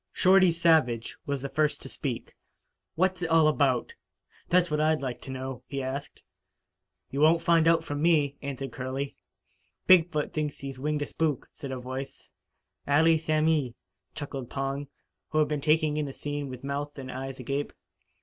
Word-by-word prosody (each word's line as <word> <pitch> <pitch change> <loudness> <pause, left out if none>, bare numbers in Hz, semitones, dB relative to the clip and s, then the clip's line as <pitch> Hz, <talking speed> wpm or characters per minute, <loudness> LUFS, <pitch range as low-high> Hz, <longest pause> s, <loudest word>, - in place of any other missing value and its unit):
Shorty 185 -1 +5
Savage 160 -9 +2
was 140 -2 -2
the 140 - -3
first 155 0 +1
to - - -7
speak. - - -5 0.6
"What's 185 +2 +1
it 175 - -1
all 165 -1 +5
about? 140 -5 +1 0.6
That's 175 -2 +3
what 150 0 +1
I'd 155 0 +3
like 125 -2 -4
to - - -10
know," 130 -1 -5
he 140 -1 -3
asked. 135 +2 -5 0.9
"You 140 - -3
won't 165 +2 +5
find 165 -2 +4
out 165 -1 +4
from 145 -2 -4
me," 150 -4 +3
answered 135 -2 -5
Curley. 130 +3 -4 0.7
"Big 180 -2 +6
foot 150 -1 -2
thinks 150 -2 -2
he 135 -1 -6
winged 150 +3 -1
a - - -3
spook," 150 -3 -2
said 140 - -7
a 130 - -3
voice. 130 +2 -7 0.6
"Allee 160 +3 +4
samee," 155 -5 +1 0.4
chuckled 135 -4 -6
Pong, 135 +1 -3 0.4
who 155 - -2
had 155 -1 +4
been 150 -2 -2
taking 155 0 +2
in 150 -1 -1
the 135 - -6
scene 145 -1 -4
with 130 0 -8
mouth 145 +1 -4
and 130 -2 -6
eyes 135 +1 -6
agape. 140 +3 -2
145 Hz, 175 wpm, -28 LUFS, 135-160 Hz, 0.9 s, Big